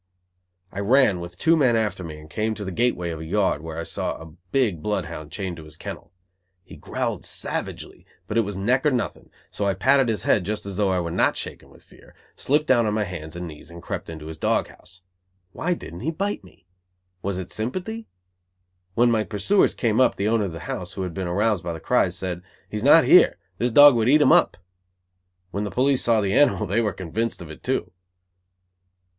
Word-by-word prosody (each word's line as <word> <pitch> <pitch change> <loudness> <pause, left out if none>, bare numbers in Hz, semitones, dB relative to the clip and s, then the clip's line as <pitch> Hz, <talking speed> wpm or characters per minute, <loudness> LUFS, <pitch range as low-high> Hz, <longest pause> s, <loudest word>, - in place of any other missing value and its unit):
I 100 - -6
ran, 105 -2 +4
with 85 0 -8
two 165 - +4
men 130 -7 +3
after 110 -4 -1
me, 80 -2 -7
and 75 - -13
came 110 +7 -2
to 105 - -6
the 95 - -4
gateway 90 -5 0
of 80 - -6
a - - -6
yard, 95 -3 0
where 80 0 -7
I 85 - -3
saw - - -3
a 80 -1 -12 0.2
big 110 - +1
bloodhound 85 -6 -4
chained 95 -4 -4
to 80 - -10
his 75 0 -13
kennel. - - -8 0.5
He - - -13
growled - - -3
savagely, - - -5 0.2
but - - -5
it 115 - +5
was 100 -2 -4
neck 125 +7 +1
or 150 - +4
nothing, 125 -4 -3 0.2
so 100 - -2
I 100 - +1
patted 135 +4 +3
his 110 - -1
head 100 - +3
just 105 +2 -4
as 100 -1 -5
though 105 -2 +2
I 95 -1 +1
were 85 -1 -3
not - - +2
shaking - - -7
with - - -18
fear, - - -20 0.2
slipped 150 +3 +1
down 120 -6 +3
on 105 - 0
my 110 - +1
hands 85 -4 -7
and 90 0 -5
knees 75 -1 -10
and 85 0 -10
crept - - -6
into 80 -2 -8
his 80 0 -8
dog - - +1
house. 95 +1 -16 0.5
Why 180 - -1
didn't 85 - -9
he 145 - -2
bite 195 - -3
me? 90 -1 -19 0.6
Was 100 -1 -2
it 95 -1 -6
sympathy? 185 - -4 0.9
When 120 +1 +4
my 110 -2 +2
pursuers 115 - +2
came 115 0 +1
up, 130 - +4
the 100 - -1
owner 110 -2 +2
of 95 - -4
the 80 -1 -8
house, - - -5
who 95 - -4
had 90 -2 -4
been 95 +1 -3
aroused 100 +2 +1
by 85 - -3
the 80 - -7
cries, - - +1
said: 90 -2 -4 0.3
"He 105 - -5
is 105 - -4
not 155 +4 +7
here. 180 - +6 0.2
This 120 - +1
dog 145 +4 +9
would 115 +1 +2
eat 150 +2 +6
him 130 - +5
up." - - +4 0.9
When 100 +2 -2
the 105 - -3
police 130 +4 +2
saw 115 -2 +3
the 100 -1 0
animal 145 -5 +3
they 105 +5 +1
were 105 -2 0
convinced 100 +6 -3
of 85 -3 -9
it 75 - -11
too. - - -2
100 Hz, 225 wpm, -24 LUFS, 85-120 Hz, 0.9 s, dog